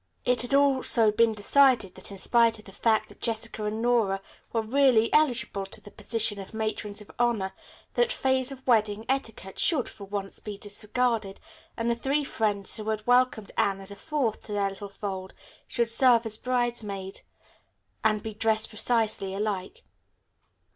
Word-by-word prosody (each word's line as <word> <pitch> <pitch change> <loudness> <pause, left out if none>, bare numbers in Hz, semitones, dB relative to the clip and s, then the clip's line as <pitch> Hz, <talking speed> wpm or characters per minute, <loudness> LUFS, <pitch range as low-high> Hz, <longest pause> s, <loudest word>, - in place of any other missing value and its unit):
It 250 0 +2
had 245 +3 +1
also 260 -5 +4
been 225 +1 +3
decided 225 -2 +4
that - - -5
in 195 - -8
spite 230 +2 +3
of 210 - -15
the 195 - -11
fact 220 +2 +1
that - - -16
Jessica 225 -2 -3
and 215 +2 -2
Nora 225 -5 +2 0.3
were 225 -1 0
really 240 -1 +3
eligible 250 -9 +2
to - - -7
the 205 - -14
position 220 -3 -1
of 195 +3 -9
matrons 215 -1 -3
of 210 - -13
honor, 225 -6 +1 0.4
that 485 0 +2
phase 260 - 0
of 265 -1 -10
wedding 215 -3 +2
etiquette 225 -7 -3
should, 300 -8 +1
for 200 - -10
once, 195 0 -5
be 210 -2 -7
disregarded, 210 0 -1 0.4
and 230 - -1
the 235 - +3
three 275 +5 0
friends 210 -6 -1
who 215 0 -4
had 215 -1 -2
welcomed 245 -4 +2
Anne 195 -1 +2
as 195 +1 -7
a - - -7
fourth 275 -3 -2
to 210 - -6
their 200 -1 +1
little 195 +1 -8
fold 190 -2 -6 0.3
should 235 -1 0
serve 235 0 +5
as 220 -1 +1
bridesmaids 225 -6 -2 0.8
and 215 -1 +2
be 220 -1 -5
dressed 220 0 +1
precisely 215 -4 0
alike. 210 - -3
220 Hz, 170 wpm, -27 LUFS, 205-245 Hz, 0.8 s, serve